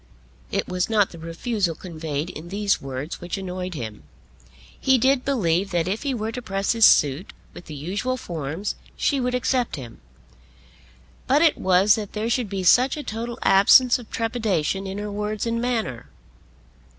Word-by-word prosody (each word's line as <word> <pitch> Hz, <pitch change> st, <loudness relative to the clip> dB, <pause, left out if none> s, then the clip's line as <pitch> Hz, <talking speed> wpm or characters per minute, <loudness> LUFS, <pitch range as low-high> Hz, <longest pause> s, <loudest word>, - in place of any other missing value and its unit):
It -, -, -1 dB
was 180 Hz, +2 st, -1 dB
not 210 Hz, -3 st, +2 dB
the 170 Hz, -, -11 dB
refusal 165 Hz, +2 st, -2 dB
conveyed 160 Hz, -2 st, -5 dB
in 165 Hz, +3 st, -9 dB
these 205 Hz, +1 st, 0 dB
words 135 Hz, +3 st, -6 dB
which 175 Hz, +3 st, -4 dB
annoyed 185 Hz, -1 st, -5 dB
him. 110 Hz, -6 st, -6 dB, 0.8 s
He 265 Hz, -1 st, +4 dB
did 260 Hz, +1 st, +2 dB
believe 195 Hz, -8 st, +1 dB
that 170 Hz, -1 st, 0 dB
if 205 Hz, +4 st, -2 dB
he 280 Hz, -3 st, -1 dB
were 220 Hz, -1 st, -3 dB
to 250 Hz, -, -5 dB
press 195 Hz, -3 st, -1 dB
his 230 Hz, -2 st, +5 dB
suit 145 Hz, +6 st, +4 dB, 0.2 s
with 175 Hz, -, -11 dB
the 155 Hz, -, -8 dB
usual 200 Hz, -, -2 dB
forms 165 Hz, -, -4 dB, 0.2 s
she 280 Hz, -, +1 dB
would 250 Hz, 0 st, -1 dB
accept 250 Hz, -1 st, 0 dB
him. 125 Hz, -6 st, -10 dB, 1.3 s
But 285 Hz, +5 st, +4 dB
it 320 Hz, -, +5 dB
was 190 Hz, +2 st, +4 dB
that 210 Hz, -3 st, -4 dB
there 220 Hz, +2 st, -2 dB
should 240 Hz, -3 st, 0 dB
be 195 Hz, -1 st, -3 dB
such 250 Hz, -, +4 dB
a 295 Hz, -, -5 dB
total 235 Hz, +1 st, -5 dB
absence 235 Hz, +6 st, +6 dB
of 235 Hz, -, -12 dB
trepidation 210 Hz, -5 st, -1 dB
in 190 Hz, +1 st, -5 dB
her 210 Hz, 0 st, -4 dB
words 210 Hz, +1 st, -3 dB
and 230 Hz, 0 st, -1 dB
manner. 225 Hz, -, -2 dB
200 Hz, 175 wpm, -23 LUFS, 170-235 Hz, 1.3 s, absence